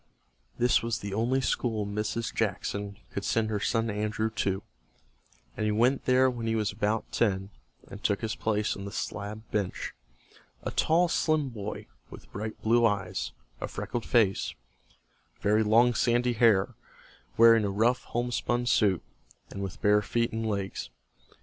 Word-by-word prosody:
This 120 Hz, 0 st, +3 dB
was 115 Hz, -1 st, -1 dB
the 100 Hz, -1 st, -6 dB
only 120 Hz, +5 st, +1 dB
school 110 Hz, -4 st, 0 dB
Mrs. 105 Hz, +2 st, -2 dB
Jackson 100 Hz, -1 st, -2 dB
could -, -, -4 dB
send 110 Hz, -1 st, 0 dB
her 105 Hz, -, 0 dB
son 115 Hz, +2 st, 0 dB
Andrew 105 Hz, +1 st, -1 dB
to, 100 Hz, -2 st, -1 dB, 0.9 s
and -, -, -3 dB
he 105 Hz, -, +2 dB
went 120 Hz, +6 st, +2 dB
there 130 Hz, +1 st, +5 dB
when 120 Hz, -3 st, -2 dB
he 115 Hz, -, +1 dB
was 110 Hz, -2 st, 0 dB
about 105 Hz, +2 st, -1 dB
ten, 95 Hz, -3 st, 0 dB, 0.4 s
and 100 Hz, +2 st, -10 dB
took 100 Hz, -2 st, +1 dB
his 110 Hz, -1 st, -2 dB
place 105 Hz, -1 st, 0 dB
on 100 Hz, -, -7 dB
the 100 Hz, -, -6 dB
slab 105 Hz, +1 st, -5 dB
bench, 100 Hz, -3 st, -2 dB, 0.7 s
a -, -, -3 dB
tall, 170 Hz, +3 st, +3 dB
slim 155 Hz, -3 st, +1 dB
boy, 105 Hz, -3 st, -6 dB, 0.2 s
with -, -, -13 dB
bright 110 Hz, +2 st, -5 dB
blue 120 Hz, +2 st, +4 dB
eyes, 100 Hz, -5 st, 0 dB, 0.3 s
a -, -, -3 dB
freckled 120 Hz, -, -4 dB
face, 110 Hz, -6 st, +2 dB, 0.8 s
very 105 Hz, +2 st, +3 dB
long 115 Hz, +3 st, +4 dB
sandy 120 Hz, +1 st, +2 dB
hair, 110 Hz, -4 st, +4 dB, 0.6 s
wearing 115 Hz, -1 st, +7 dB
a 100 Hz, -, 0 dB
rough 115 Hz, +6 st, +1 dB
homespun 120 Hz, 0 st, -1 dB
suit, 100 Hz, -7 st, +3 dB, 0.5 s
and 100 Hz, -, -6 dB
with 95 Hz, -2 st, -6 dB
bare 105 Hz, 0 st, +5 dB
feet 115 Hz, +3 st, 0 dB
and 110 Hz, 0 st, -2 dB
legs. 100 Hz, -2 st, -3 dB
110 Hz, 155 wpm, -28 LUFS, 105-120 Hz, 0.9 s, wearing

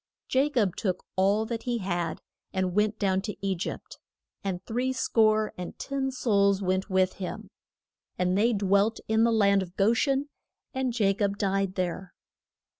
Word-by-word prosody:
Ja 270 Hz, +3 st, +3 dB
cob 215 Hz, -10 st, +1 dB
took 185 Hz, -3 st, -2 dB
all 200 Hz, +3 st, +2 dB
that 230 Hz, 0 st, -4 dB
he 245 Hz, -2 st, -1 dB
had 175 Hz, -5 st, -3 dB, 0.3 s
and 185 Hz, -2 st, -1 dB
went 210 Hz, +2 st, +1 dB
down 190 Hz, -2 st, +1 dB
to 210 Hz, 0 st, -5 dB
E 195 Hz, -, +1 dB
gypt. 170 Hz, -, -6 dB, 0.4 s
And 190 Hz, -2 st, -3 dB
three 250 Hz, +3 st, -1 dB
score 215 Hz, -3 st, +2 dB
and 180 Hz, -, -6 dB
ten 275 Hz, -1 st, -2 dB
souls 200 Hz, -6 st, +2 dB
went 185 Hz, +1 st, -1 dB
with 185 Hz, -1 st, +2 dB
him. 180 Hz, -, -6 dB, 0.7 s
And 180 Hz, 0 st, +1 dB
they 220 Hz, +4 st, +3 dB
dwelt 200 Hz, +2 st, +2 dB
in 220 Hz, +1 st, +3 dB
the 235 Hz, -, +3 dB
land 200 Hz, -3 st, +4 dB
of 180 Hz, -1 st, -8 dB
Go 210 Hz, +3 st, +4 dB
shen, 275 Hz, +4 st, +1 dB, 0.4 s
and 260 Hz, -2 st, -1 dB
Ja 195 Hz, -2 st, +4 dB
cob 200 Hz, 0 st, -1 dB
died 195 Hz, -1 st, 0 dB
there. 180 Hz, 0 st, -3 dB
200 Hz, 170 wpm, -27 LUFS, 190-225 Hz, 0.7 s, land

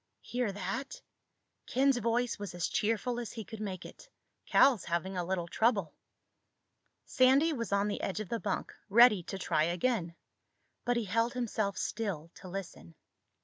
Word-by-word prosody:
"Hear 245 Hz, -4 st, -2 dB
that?" 200 Hz, +8 st, -4 dB, 0.7 s
Ken's 265 Hz, 0 st, +3 dB
voice 235 Hz, +1 st, 0 dB
was 205 Hz, -3 st, -6 dB
as 175 Hz, -, -1 dB
cheerful 230 Hz, +3 st, 0 dB
as 235 Hz, -4 st, -6 dB
he 225 Hz, -, -5 dB
could 220 Hz, +4 st, -9 dB
make 190 Hz, -3 st, -5 dB
it. -, -, -13 dB, 0.4 s
"Cal's 260 Hz, -8 st, +5 dB
having 170 Hz, +3 st, -2 dB
a 180 Hz, -, -1 dB
little 175 Hz, -1 st, -2 dB
trouble." 200 Hz, -5 st, +1 dB, 1.1 s
Sandy 270 Hz, +5 st, +4 dB
was 230 Hz, -6 st, -4 dB
on 200 Hz, +1 st, +2 dB
the 205 Hz, -, -3 dB
edge 195 Hz, -, -2 dB
of 215 Hz, -, -5 dB
the 230 Hz, -, -1 dB
bunk, -, -, -3 dB, 0.2 s
ready 225 Hz, -2 st, +7 dB
to 195 Hz, +3 st, -6 dB
try 155 Hz, -4 st, +1 dB
again. 175 Hz, 0 st, 0 dB, 0.7 s
But 245 Hz, 0 st, +2 dB
he 235 Hz, -, -1 dB
held 230 Hz, +4 st, +1 dB
himself 220 Hz, -5 st, -1 dB
still 185 Hz, -8 st, -3 dB
to 185 Hz, -, -11 dB
listen. 175 Hz, -, -7 dB
210 Hz, 160 wpm, -32 LUFS, 185-240 Hz, 1.1 s, ready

